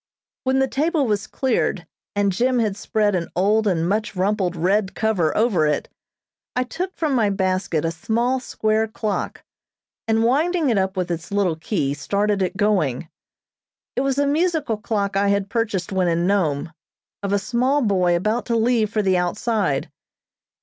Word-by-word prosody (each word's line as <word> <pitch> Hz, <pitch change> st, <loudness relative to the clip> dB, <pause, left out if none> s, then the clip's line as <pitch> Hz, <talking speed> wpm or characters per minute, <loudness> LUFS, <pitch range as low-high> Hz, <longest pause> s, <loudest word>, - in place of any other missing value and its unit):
When 260 Hz, +1 st, +2 dB
the 265 Hz, 0 st, +3 dB
table 300 Hz, +2 st, +1 dB
was 210 Hz, -3 st, -1 dB
cleared 230 Hz, -8 st, -1 dB, 0.3 s
and 200 Hz, -1 st, +2 dB
Jim 250 Hz, +7 st, +1 dB
had 215 Hz, -4 st, +1 dB
spread 210 Hz, 0 st, 0 dB
an 175 Hz, -2 st, -1 dB
old 210 Hz, +4 st, +2 dB
and 170 Hz, -4 st, +1 dB
much 210 Hz, +2 st, -1 dB
rumpled 190 Hz, -1 st, 0 dB
red 190 Hz, +4 st, +1 dB
cover 195 Hz, -8 st, +1 dB
over 205 Hz, -9 st, +3 dB
it, 150 Hz, -, -1 dB, 0.7 s
I 250 Hz, -, +2 dB
took 365 Hz, +9 st, -5 dB
from 310 Hz, -4 st, -1 dB
my 225 Hz, -5 st, +3 dB
basket 185 Hz, -4 st, 0 dB
a 165 Hz, -, 0 dB
small 235 Hz, +8 st, 0 dB
square 220 Hz, -2 st, 0 dB
clock, 215 Hz, -1 st, -3 dB, 0.6 s
and 225 Hz, 0 st, +2 dB
winding 305 Hz, +4 st, +2 dB
it 210 Hz, -, +2 dB
up 190 Hz, 0 st, -1 dB
with 180 Hz, -1 st, -1 dB
its 170 Hz, +2 st, -5 dB
little 200 Hz, -5 st, +1 dB
key, 155 Hz, -4 st, -1 dB
started 200 Hz, +7 st, 0 dB
it 185 Hz, 0 st, -1 dB
going. 175 Hz, -, +1 dB, 0.9 s
It -, -, +1 dB
was 275 Hz, 0 st, 0 dB
a 285 Hz, -, +3 dB
musical 305 Hz, -5 st, +1 dB
clock 205 Hz, -2 st, -2 dB
I 200 Hz, +1 st, +2 dB
had 200 Hz, 0 st, 0 dB
purchased 215 Hz, -6 st, -1 dB
when 190 Hz, -2 st, +1 dB
in 170 Hz, 0 st, +1 dB
Nome, 170 Hz, -5 st, 0 dB, 0.5 s
of 200 Hz, -1 st, -2 dB
a 205 Hz, -, +3 dB
small 255 Hz, +7 st, +1 dB
boy 185 Hz, -5 st, +2 dB
about 215 Hz, +7 st, -1 dB
to 235 Hz, -, +1 dB
leave 225 Hz, -1 st, +2 dB
for 215 Hz, -2 st, 0 dB
the 190 Hz, -2 st, +3 dB
outside. 185 Hz, -, -1 dB
205 Hz, 170 wpm, -22 LUFS, 185-235 Hz, 0.9 s, the